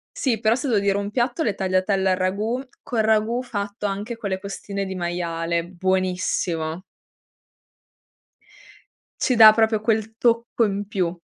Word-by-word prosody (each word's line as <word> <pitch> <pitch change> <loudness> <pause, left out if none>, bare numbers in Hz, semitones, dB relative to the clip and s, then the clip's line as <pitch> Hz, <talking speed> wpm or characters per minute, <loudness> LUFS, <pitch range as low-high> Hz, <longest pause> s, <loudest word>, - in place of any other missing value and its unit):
Sì, 235 -6 0
però 220 +1 +3
se 270 +3 -3
devo 225 -5 +2
dire 200 0 +1
un 200 0 -3
piatto, 240 +6 -1
le 215 -11 0
tagliatelle 190 0 +1
al - - +3
ragù, 205 +7 -1 0.2
col 230 -3 -1
ragù 220 +2 +2
fatto 205 -4 -5
anche 205 +4 -3
con 215 -3 -4
le 190 0 -2
costine 200 0 -5
di 190 - -5
maiale. 170 -1 -2
Buonissimo. 180 -2 -1 2.4
Ci 255 - +2
dà 220 -2 +10
proprio 220 -1 +2
quel 220 0 -1
tocco 235 0 +2
in 200 -1 -3
più. 185 -4 -1
200 Hz, 150 wpm, -23 LUFS, 185-225 Hz, 2.4 s, dà